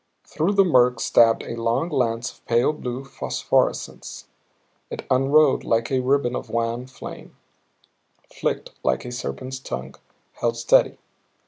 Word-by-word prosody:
Through 165 +6 -1
the 200 -1 +5
murk 125 -7 +4
stabbed 115 0 +4
a - - -6
long 115 +9 0
lance 115 -2 0
of - - -24
pale 120 +5 +3
blue 130 -2 -5
phosphorescence. 135 - -2 0.6
It - - -7
unrolled 135 +3 +4
like 115 +2 0
a 130 - +2
ribbon 130 -1 +1
of - - -5
wan 115 +2 -2
flame, 130 - -10 1.0
flicked - - -3
like - - 0
a 125 - -6
serpent's 130 +1 -5
tongue 65 - -6 0.4
held 115 0 -1
steady. 115 - +3
125 Hz, 135 wpm, -23 LUFS, 115-135 Hz, 1.0 s, the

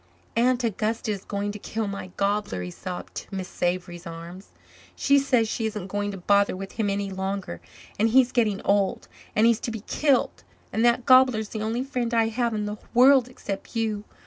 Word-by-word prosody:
"Aunt 245 +2 +2
Augusta 220 0 -1
is 200 -2 -4
going 205 0 -2
to 210 - -8
kill 220 +1 -3
my 200 -1 -5
gobbler," 200 - 0
he 90 - -6
sobbed 180 - -7
in 195 - -4
Miss 185 -1 -7
Avery's 175 0 -2
arms. 170 +3 -9 0.5
"She 280 0 +4
says 250 -5 +2
she 220 0 -1
isn't 210 -3 -5
going 205 +1 -2
to 200 - -5
bother 200 +2 +2
with 195 0 -7
him 220 -3 -1
any 200 0 -2
longer 190 - -4 0.4
and 225 +2 +4
he's 255 +1 +5
getting 215 -5 +1
old 200 -1 +1 0.3
and 215 - +4
he's 230 -1 +4
to - - -4
be 225 -2 -5
killed. 240 - +1 0.3
And 220 - +1
that 240 0 +3
gobbler 255 -2 +6
is 215 - -7
the 215 - -5
only 225 +3 -1
friend 245 -3 -2
I 225 -1 +3
have 235 0 -1
in 210 -1 -2
the 210 0 -5 0.2
world 255 0 +6
except 200 -4 -7
you. 220 -2 -1
210 Hz, 200 wpm, -25 LUFS, 195-235 Hz, 0.5 s, gobbler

